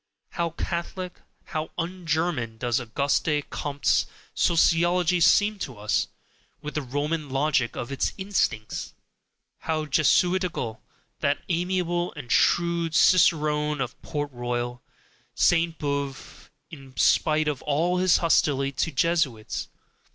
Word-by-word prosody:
How 170 Hz, -1 st, -1 dB
Catholic, 170 Hz, +2 st, -4 dB, 0.3 s
how 155 Hz, -3 st, -4 dB
un 175 Hz, +1 st, -4 dB
German 155 Hz, -8 st, -1 dB
does 120 Hz, +1 st, 0 dB
Auguste 140 Hz, +5 st, 0 dB
Comte's 145 Hz, -1 st, 0 dB, 0.3 s
Sociology 175 Hz, +1 st, +3 dB
seem 205 Hz, +4 st, +4 dB
to 130 Hz, -, -5 dB
us, 105 Hz, 0 st, 0 dB, 0.5 s
with 150 Hz, -, -7 dB
the 155 Hz, -, -1 dB
Roman 145 Hz, +3 st, -2 dB
logic 135 Hz, -3 st, +1 dB
of 120 Hz, -, -5 dB
its 140 Hz, -, 0 dB
instincts! 185 Hz, -, -2 dB, 0.6 s
How 155 Hz, -1 st, -2 dB
Jesuitical, 155 Hz, -, +1 dB, 0.4 s
that 145 Hz, 0 st, 0 dB
amiable 175 Hz, 0 st, 0 dB
and 135 Hz, -5 st, -8 dB
shrewd 170 Hz, -1 st, +2 dB
cicerone 150 Hz, -4 st, +3 dB
of 125 Hz, -1 st, -4 dB
Port 145 Hz, -1 st, -4 dB
Royal, 120 Hz, 0 st, -3 dB, 0.5 s
Sainte 165 Hz, -1 st, +2 dB
Beuve, 140 Hz, -1 st, -4 dB, 0.2 s
in 135 Hz, -5 st, -12 dB
spite 155 Hz, +6 st, +3 dB
of 145 Hz, -3 st, -2 dB
all 170 Hz, +5 st, +1 dB
his 185 Hz, -2 st, +4 dB
hostility 140 Hz, -5 st, +2 dB
to 140 Hz, +4 st, -1 dB
Jesuits! 140 Hz, -7 st, 0 dB
155 Hz, 115 wpm, -25 LUFS, 135-170 Hz, 0.6 s, seem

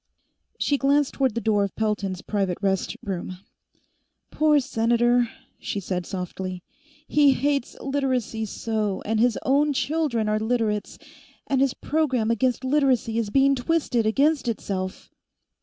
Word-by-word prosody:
She 285 Hz, -2 st, +1 dB
glanced 280 Hz, 0 st, +2 dB
toward 265 Hz, -5 st, 0 dB
the 235 Hz, -, -1 dB
door 210 Hz, -2 st, +2 dB
of 200 Hz, -, -4 dB
Pelton's 205 Hz, -4 st, -2 dB
private 195 Hz, -4 st, -1 dB
rest 195 Hz, -2 st, -1 dB
room. 185 Hz, -2 st, -4 dB, 0.9 s
"Poor 305 Hz, -1 st, +4 dB
Senator!" 240 Hz, -1 st, +2 dB, 0.3 s
she 205 Hz, -, -3 dB
said 180 Hz, -2 st, -3 dB
softly. 185 Hz, -1 st, -5 dB, 0.4 s
"He 290 Hz, -2 st, +5 dB
hates 280 Hz, -1 st, -1 dB
Literacy 260 Hz, -5 st, -1 dB
so, 215 Hz, -2 st, -2 dB
and 220 Hz, +1 st, 0 dB
his 240 Hz, 0 st, +3 dB
own 290 Hz, +2 st, +2 dB
children 280 Hz, -6 st, 0 dB
are 215 Hz, 0 st, +1 dB
Literates, 220 Hz, -2 st, -1 dB, 0.5 s
and 270 Hz, -2 st, +1 dB
his 275 Hz, -2 st, +2 dB
program 260 Hz, -7 st, 0 dB
against 250 Hz, +3 st, 0 dB
Literacy 260 Hz, -5 st, +2 dB
is 220 Hz, -3 st, -2 dB
being 275 Hz, +4 st, +4 dB
twisted 250 Hz, -4 st, 0 dB
against 280 Hz, +4 st, +2 dB
itself!" 190 Hz, -4 st, -4 dB
235 Hz, 135 wpm, -24 LUFS, 210-275 Hz, 0.9 s, He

